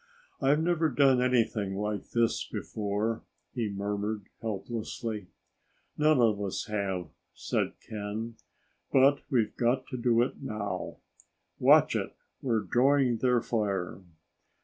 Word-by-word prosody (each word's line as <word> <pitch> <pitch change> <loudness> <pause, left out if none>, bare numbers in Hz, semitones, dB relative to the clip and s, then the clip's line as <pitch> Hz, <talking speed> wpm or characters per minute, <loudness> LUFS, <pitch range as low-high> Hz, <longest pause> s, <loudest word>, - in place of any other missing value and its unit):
"I've 145 +3 +3
never 165 -2 +2
done 135 -2 +4
anything 115 -6 +1
like 105 0 -3
this 115 -1 +1
before," 105 +2 -2 0.3
he 115 -4 -1
murmured 100 +1 -2 0.2
helplessly. 110 -1 -4 0.7
"None 155 -2 +4
of 110 -4 +3
us 100 -1 -2
have," 95 -6 -2 0.3
said - - -1
Ken; 110 +2 -4 0.6
"but 140 +1 +5
we've 115 -5 +1
got 125 +2 +1
to 130 - -4
do 120 -1 +3
it 125 - -5
now. 110 -6 -4 0.6
Watch - - +6
it! - - -2 0.3
We're 115 -4 +1
drawing 125 +4 +3
their 125 0 +2
fire!" 100 -7 -1
115 Hz, 120 wpm, -29 LUFS, 105-125 Hz, 0.7 s, Watch